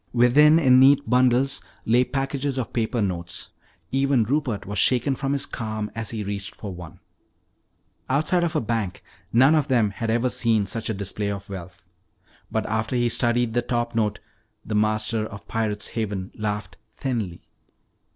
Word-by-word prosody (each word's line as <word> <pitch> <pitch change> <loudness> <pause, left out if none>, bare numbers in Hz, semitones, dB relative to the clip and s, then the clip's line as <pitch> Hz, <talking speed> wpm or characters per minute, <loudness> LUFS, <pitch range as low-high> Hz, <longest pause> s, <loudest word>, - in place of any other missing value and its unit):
Within, 140 +6 +6
in 130 -5 +6
neat 140 +1 +5
bundles, 125 +2 +3 0.2
lay 120 +3 +4
packages 135 +1 -2
of 130 - -3
paper 115 -1 0
notes. 85 -3 -4 0.4
Even 135 -2 +2
Rupert 120 -5 -1
was 100 +1 -2
shaken 125 +4 +3
from 135 +1 -2
his 140 - 0
calm 110 -2 -4
as 115 -2 -3
he 110 -2 -3
reached 100 -1 -5
for 100 -3 -7
one. 85 -2 -10 1.1
Outside 155 +6 +2
of 170 -1 -1
a 155 - +2
bank 110 -4 -2 0.3
none 130 +6 +5
of 150 -3 +2
them 115 -6 +2
had 115 +3 -4
ever 120 +3 +2
seen 115 -4 +1
such 115 +3 -3
a 110 - -1
display 100 +1 -3
of 100 0 -6
wealth. 95 0 -9 0.7
But - - -1
after 110 +3 -1
he 120 -1 +2
studied 120 -1 +1
the 120 - +2
top 120 0 -2
note, 110 -2 0 0.5
the 110 - -4
master 110 +1 +1
of 105 - -11
Pirate's 105 -2 -2
Haven 100 -4 -3
laughed 105 -3 -4 0.2
thinly. 110 -10 -3
115 Hz, 165 wpm, -24 LUFS, 105-130 Hz, 1.1 s, Within